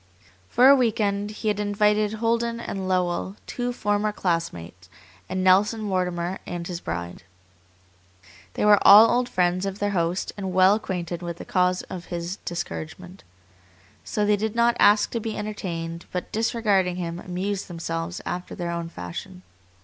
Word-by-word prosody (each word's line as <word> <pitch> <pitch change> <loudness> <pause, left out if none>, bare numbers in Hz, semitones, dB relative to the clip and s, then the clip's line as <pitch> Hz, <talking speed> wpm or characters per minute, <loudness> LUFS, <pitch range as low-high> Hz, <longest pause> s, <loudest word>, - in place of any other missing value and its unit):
For 250 - +5
a 280 - +9
week 235 -5 +1
end 200 0 0
he 215 +1 -3
had 205 -1 -1
invited 210 +1 +2
Holden 230 +1 0
and 195 -4 -4
Lowell, 185 +1 0
two 245 0 -3
former 210 -2 0
classmates, 90 - -3 0.4
and 185 0 -2
Nelson 200 +4 +4
Mortimer 180 -2 -2
and 175 -1 -5
his 175 -1 -5
bride. 85 +1 -5 1.3
They - - 0
were 205 -1 +7
all 215 +3 +9
old 245 0 +1
friends 180 0 +1
of 195 0 -3
their 205 0 -1
host 175 -1 -1
and 190 -2 -4
well 185 +1 +6
acquainted 175 -5 -3
with 170 -1 -5
the - - -9
cause 180 -1 +1
of 180 -1 -8
his 175 +2 -4
discouragement. 175 +2 -6 0.8
So 210 - -1
they 205 0 +3
did 220 +2 -2
not 235 0 +3
ask 205 +1 +5
to 230 - -1
be 220 0 -4
entertained, 170 -5 -5
but, 180 - -4
disregarding 210 -5 +1
him, 170 -1 -4
amused 185 +2 -3
themselves 165 0 -4
after 180 0 -5
their 175 -1 -3
own 170 -1 -4
fashion. 180 - -8
190 Hz, 160 wpm, -24 LUFS, 175-210 Hz, 1.3 s, a